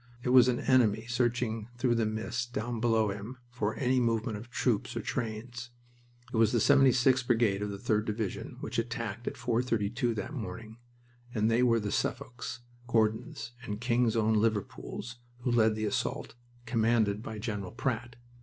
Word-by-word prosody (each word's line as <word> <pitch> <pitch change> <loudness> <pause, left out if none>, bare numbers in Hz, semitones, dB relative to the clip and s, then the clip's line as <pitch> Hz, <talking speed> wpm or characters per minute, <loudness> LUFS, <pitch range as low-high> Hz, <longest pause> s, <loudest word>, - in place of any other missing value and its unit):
It 125 - -1
was 125 -1 +7
an 125 -1 +1
enemy 115 -4 +3
searching 120 -2 0
through 120 -1 +2
the 115 -2 +1
mist 115 +3 -3
down 115 +1 -2
below 110 -2 +2
him 105 +6 -7
for 110 -3 -2
any 130 -1 +2
movement 115 -2 0
of 110 +4 -8
troops 120 -4 0
or - - -1
trains. 120 +1 -4 0.6
It - - 0
was 110 -1 +4
the 120 - +2
76th 130 0 +4
Brigade 115 -5 +2
of 105 - -2
the 100 - -5
3d 105 0 0
Division 105 -2 -4
which - - -2
attacked 115 -1 -4
at - - -3
four 120 -1 +1
thirty 110 -5 0
two 120 -1 0
that 105 +8 -4
morning, 110 -3 -6 0.6
and 110 +1 +2
they 115 +2 +3
were 115 -2 +4
the 105 -1 -3
Suffolks, 125 0 -3 0.3
Gordons, 110 0 0
and 105 -3 -5
King's 120 -1 +2
Own 110 -1 +3
Liverpools 110 +2 -1 0.2
who 125 - 0
led 110 -2 +4
the 110 0 -2
assault, 105 - -2 0.3
commanded 110 -3 +2
by 110 -1 -6
General 105 -4 -4
Pratt. 120 -1 -3
115 Hz, 175 wpm, -30 LUFS, 110-120 Hz, 0.6 s, was